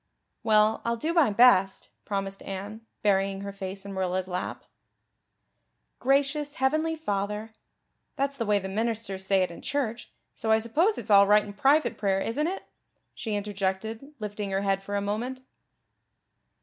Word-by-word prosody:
"Well, 215 0 +3
I'll 235 0 0
do 315 +8 -1
my 330 -8 +5
best," 200 -3 +4
promised 195 -1 -3
Anne, 200 +3 -6 0.2
burying 195 -1 +2
her 200 0 -5
face 195 0 -6
in 200 - -6
Marilla's 185 -1 -1
lap. 180 -1 -4 1.4
"Gracious 280 +2 +1
heavenly 310 +5 +1
Father 210 -5 -3 0.6
that's 275 +1 -1
the 230 -5 -3
way 210 -1 +4
the 190 -1 -3
ministers 210 -2 -2
say 190 -1 +3
it 180 - -2
in 170 - -10
church, 245 -5 -3 0.2
so 225 - -4
I 220 - +6
suppose 305 - +1
it's 220 -1 -4
all 200 0 +8
right 210 +1 +5
in 205 - -8
private 280 +9 +2
prayer, 195 -2 +1
isn't 285 +10 -1
it?" 380 +2 -4 0.5
she 220 -3 -4
interjected, 205 +6 -3
lifting 210 -2 -4
her 195 0 0
head 195 -1 +1
for 200 +1 -5
a 200 - +1
moment. 235 +6 -3
210 Hz, 160 wpm, -27 LUFS, 195-250 Hz, 1.4 s, all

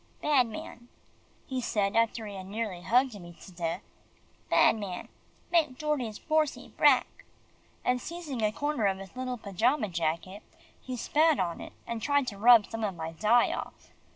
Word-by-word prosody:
"Bad 280 -5 +3
man," 235 +2 -9 0.6
he 260 -1 -3
said 205 -4 0
after 230 0 +1
he 205 - -7
had 190 -1 -8
nearly 205 -3 -4
hugged 240 0 +2
me 175 -1 -12
to - - -12
death, 170 -2 -3 0.7
"bad - - +5
man 200 -5 -6 0.4
make 310 -7 +2
Dordie's 265 -8 -2
Borsie 310 -2 0
brack!" - - +3 0.6
and 250 0 +1
seizing 315 -7 -5
a 215 -1 +2
corner 290 -3 0
of 190 -1 0
his 195 +2 -11
little 255 -1 -3
pajama 220 +4 0
jacket, 170 +4 -2 0.4
he 255 -1 -5
spat 310 +5 +3
on 175 -3 -2
it, - - -9
and 235 -1 -4
tried 285 +1 +2
to 200 - -11
rub 230 -1 +7
some 225 -1 -5
of 200 -4 -1
my 160 -1 -5
dye 215 +8 +3
off. - - -8
225 Hz, 170 wpm, -29 LUFS, 195-255 Hz, 0.7 s, rub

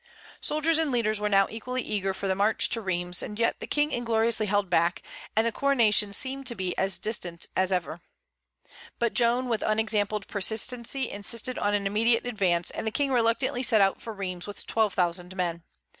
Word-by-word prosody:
Soldiers 310 +2 +2
and 315 -3 0
leaders 215 -4 +1
now 205 -2 +3
were - - -13
equally 250 +3 -4
eager 195 -2 -1
for 195 +1 -3
the 190 - +2
march 205 +3 +2
to 230 - -1
Rheims; 180 -2 0
yet 230 +2 0
the - - -7
King 295 0 +1
ingloriously 230 -2 +1
held 205 0 +1
back, 170 0 +1 0.3
and 220 +1 +3
the 230 - +1
coronation 225 -6 +2
seemed 265 +5 -3
to 240 - -1
be 185 -3 -3
as 190 0 +2
distant 175 -6 -3
as 185 0 +1
ever. 175 -2 -2 1.0
But 235 -1 0
Joan 245 +1 +2
with 230 -3 -1
unexampled 215 -1 0
persistency 235 +5 -1
insisted 230 +5 -1
on 205 0 +1
an 200 -1 -1
immediate 225 +4 +2
advance, 185 -8 0
and 220 - -5
the - - +3
King 275 +5 -1
reluctantly 245 +1 +1
set 230 -4 +4
out 195 -1 +2
for 230 - -6
Rheims 185 -3 -5
with 205 - -8
twelve 220 -3 +1
thousand 180 0 0
men. 170 -2 -2
215 Hz, 190 wpm, -27 LUFS, 195-235 Hz, 1.0 s, set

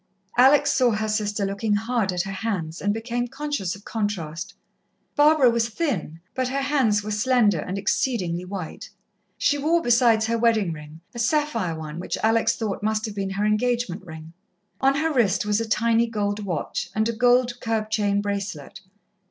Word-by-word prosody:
Alex 265 +4 +5
saw 255 -2 +3
her 215 +1 -1
sister 210 -1 -1
looking 200 +2 -1
hard 225 -2 0
at 180 -1 -1
her 195 - -5
hands, 185 -6 -3
and 205 - +1
became 235 +3 -2
conscious 275 - -3
of 200 - -15
contrast. 175 -8 -4 0.6
Barbara 295 -4 +5
was 230 0 0
thin, 215 - -3
but 255 -1 -1
her 275 +2 -1
hands 255 -8 +2
were 215 - -4
slender 210 -4 +2
and 185 +5 -4
exceedingly 190 -4 -1
white. 180 -3 -7 0.5
She 290 - +1
wore, 325 +4 +2
besides 235 -5 +3
her 230 +1 0
wedding 220 -7 +2
ring, 150 +1 -11
a 235 - -7
sapphire 235 - 0
one, 155 +1 -7
which 180 - -3
Alex 225 +1 +3
thought 215 -3 -3
must 215 +1 0
have 215 - -5
been 195 -1 -3
her 195 +2 -1
engagement 215 -3 0
ring. 160 -2 -10 0.5
On 270 0 +3
her 315 +2 0
wrist 210 -7 +2
was 210 +1 +1
a 225 - -4
tiny 230 +1 +2
gold 205 -2 -2
watch, 175 -6 -3
and 215 +1 +2
a - - +1
gold 245 +1 +2
curb 220 -2 -2
chain 205 -2 +1
bracelet. 195 -5 -4
215 Hz, 175 wpm, -24 LUFS, 195-240 Hz, 0.6 s, Alex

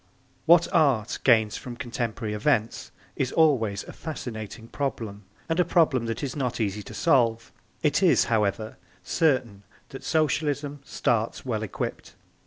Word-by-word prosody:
What 170 +1 +6
Art 135 -9 +2
gains 110 -4 +4
from 125 -2 -8
contemporary 115 -2 -3
events 115 0 0 0.2
is 130 -2 -1
always 115 -11 +2
a - - -11
fascinating 115 -7 -7
problem 110 -7 -4 0.2
and 165 +1 -1
a - - +6
problem 155 -8 +2
that 115 +4 -3
is 135 -3 -3
not 125 -5 -2
easy 105 -1 -1
to - - -10
solve. 120 -8 +2 0.3
It - - +2
is, - - +5
however, 110 +2 -1 0.3
certain 130 - +1 0.3
that 135 - -9
Socialism 145 -2 0
starts 115 -4 -1
well 110 -4 -2
equipped. 110 - -5
120 Hz, 140 wpm, -26 LUFS, 110-145 Hz, 0.3 s, What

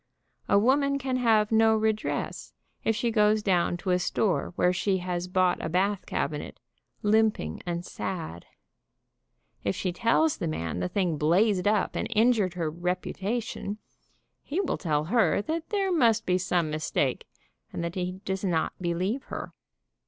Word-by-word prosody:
A - - +5
woman 280 +6 +3
can 260 -1 -1
have 220 -3 +3
no 220 0 +5
redress, 215 -1 -2 0.3
if 225 - +1
she 235 +2 0
goes 210 -1 +3
down 175 -3 +2
to 185 +1 -2
a 180 - +3
store 185 +1 0
where 180 0 +3
she 190 +2 +1
has 180 -1 -3
bought 185 -1 +1
a - - -2
bath 190 +3 0
cabinet, 150 +1 -3 0.4
limping 210 - +2
and 170 0 -3
sad. 160 - -5 1.2
If 100 - 0
she 185 - -2
tells 235 - +2
the 170 - -2
man 85 - -3
the 90 0 -1
thing 175 -6 0
blazed 185 +5 +3
up 210 -1 +1
and - - -1
injured 215 -5 +3
her 165 -3 -1
reputation, 195 +5 -3 0.6
he 310 +6 -3
will 395 - -1
tell 150 -4 0
her 220 +8 +2
that 320 +6 -3
there 395 -3 0
must 235 -10 +3
be 180 0 +2
some 175 -3 0
mistake, 155 0 -1 0.4
and - - -4
that 170 0 -3
he 180 0 -4
does 190 0 -2
not 170 -4 0
believe 185 +9 -1
her. - - -6
190 Hz, 160 wpm, -27 LUFS, 175-220 Hz, 1.2 s, A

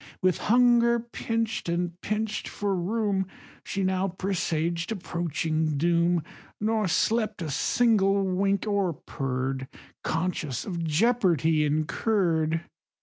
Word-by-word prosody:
With 185 -2 +2
hunger 235 0 +4
pinch'd, 230 -3 -3
and 175 0 -2
pinch'd 215 0 -2
for 200 -1 -2
room, 195 +1 0 0.4
She 195 - -2
now 190 0 +1
presaged 170 -2 -1
approaching 160 -5 -1
doom, 170 +1 +2 0.4
Nor 215 -1 +1
slept 215 +4 +1
a 155 - -3
single 200 - +3
wink, 195 +1 +1
or 200 -4 +1
purr'd, 130 -1 -3 0.4
Conscious 160 -6 -2
of 170 -4 -3
jeopardy 165 - +2
incurr'd. 160 0 +1
185 Hz, 105 wpm, -27 LUFS, 165-210 Hz, 0.4 s, hunger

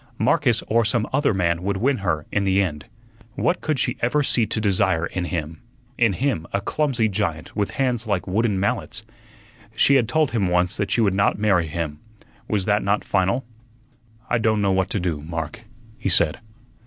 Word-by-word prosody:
Marcus 125 -1 +2
or 115 +1 +2
some 110 0 0
other 145 +1 +2
man 85 -4 0
would 100 +1 -1
win 130 +6 +1
her 80 -6 -1
in 105 - +1
the 95 0 +2
end. 80 -7 -1 0.5
What 180 - 0
could 155 -2 -1
she - - -1
ever 145 +5 +1
see 120 -4 +2
to 110 - -2
desire 95 -5 +2
in 90 0 -3
him 80 -2 -4 0.3
in 120 -4 +3
him, 120 - -1
a 100 - 0
clumsy 130 +1 0
giant, 90 -6 -3
with 105 -2 0
hands 125 -4 0
like 100 -4 0
wooden 105 +1 0
mallets? 115 +1 -2 0.7
She 140 - +4
had 125 -5 +3
told 155 -3 +2
him 105 -6 +1
once 90 +1 +1
that 100 - -1
she 120 - +2
would 100 -4 +3
not 100 +1 +2
marry 100 -5 +2
him. 75 -2 -4 0.5
Was 100 -3 0
that 105 0 +2
not 100 +1 0
final? 100 +6 0 0.8
"I 120 - +1
don' 110 -1 +2
know 100 -1 +2
what 95 0 +1
to 105 - -1
do, 85 -5 -2
Mark," 80 +6 -5 0.4
he - - -1
said. 85 -1 +3
100 Hz, 190 wpm, -23 LUFS, 90-115 Hz, 0.8 s, She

